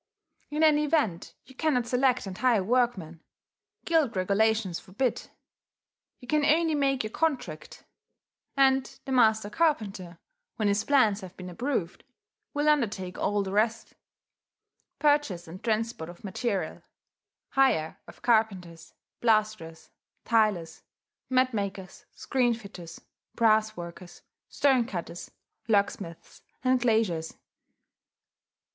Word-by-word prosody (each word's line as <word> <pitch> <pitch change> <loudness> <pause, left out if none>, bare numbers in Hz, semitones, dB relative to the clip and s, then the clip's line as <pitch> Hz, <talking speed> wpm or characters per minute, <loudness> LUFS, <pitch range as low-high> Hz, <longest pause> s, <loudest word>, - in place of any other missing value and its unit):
In 300 +2 0
any 300 -1 +4
event 270 - -1
you 265 - -16
cannot 260 -4 0
select 250 0 +1
and 190 -1 -6
hire 235 -3 +2
workmen: 195 -8 0 0.6
guild 315 -8 +2
regulations 200 0 +1
forbid. 220 +6 -3 0.9
You 245 - -14
can 300 +2 +1
only 320 +2 +3
make 275 -3 +1
your 215 - -5
contract; 250 - -3 0.7
and 265 -1 +4 0.2
the 270 - -5
master 220 -4 +3
carpenter, 210 - -1 0.4
when 215 - 0
his 205 +1 +1
plans 220 -8 +3
have 185 -1 -11
been 180 -1 -8
approved, 225 -4 -3 0.5
will 290 +1 -1
undertake 210 -11 0
all 205 0 0
the 190 - -5
rest, 220 +3 0 1.0
purchase 290 - +1
and 180 +5 -10
transport 225 -7 -2
of 175 - -13
material, 200 +1 -3 0.7
hire 240 -13 +1
of - - -15
carpenters, 195 -8 0 0.3
plasterers, 215 -8 0 0.3
tilers, 210 -8 +1 0.5
mat 255 -1 +2
makers, 195 -3 -5
screen 245 -3 +1
fitters, 185 -7 -11 0.3
brass 220 -1 +3
workers, 175 +1 -10 0.3
stone 260 -5 +2
cutters, 175 -2 -6 0.4
locksmiths, 200 -5 -1 0.2
and 255 -1 +2
glaziers. 220 -9 0
220 Hz, 115 wpm, -27 LUFS, 185-260 Hz, 1.0 s, any